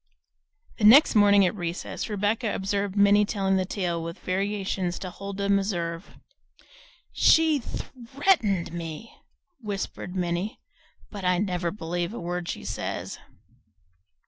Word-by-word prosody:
The - - -3
next 255 +9 +8
morning 205 -2 +6
at 180 - 0
recess 175 +2 -5
Rebecca 210 +2 -1
observed 200 0 -2
Minnie 205 0 +5
telling 195 -2 0
the 185 - 0
tale 180 -4 -2
with 165 +1 -6
variations 190 -1 -2
to 185 -2 -6
Huldah 200 +1 -5
Meserve. 190 -3 -1 1.0
"She 320 -2 +4
THREATENED 240 - -1
me," 165 -2 -7 0.4
whispered 195 -4 -5
Minnie, 180 +5 -2 0.5
"but 205 -3 -7
I 180 0 +2
never 180 -3 -1
believe 175 +1 -4
a - - -5
word 175 0 -4
she - - -5
says." - - -4
195 Hz, 120 wpm, -26 LUFS, 175-210 Hz, 1.0 s, next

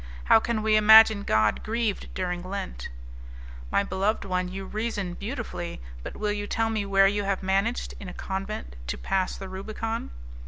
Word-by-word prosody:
How - - +6
can 220 -1 -2
we 215 0 +4
imagine 220 0 +8
God 110 - +2
grieved 225 -2 -2
during 180 -1 -2
Lent?" 180 - -5 0.8
"My - - +2
beloved 200 +2 -1
one, 185 -1 -1
you 190 +1 -6
reason 210 -4 -3
beautifully, 215 -5 -5 0.2
but - - -8
will 210 -1 -1
you 205 0 -3
tell 225 +1 0
me 210 -2 -1
where 195 0 +5
you 205 +1 0
have 195 -1 -1
managed, 195 +5 0
in 195 - -7
a - - -6
convent, 190 - -5
to 60 - -2
pass 190 -1 -1
the 195 - -7
Rubicon?" 215 +4 -4
200 Hz, 170 wpm, -26 LUFS, 190-220 Hz, 0.8 s, imagine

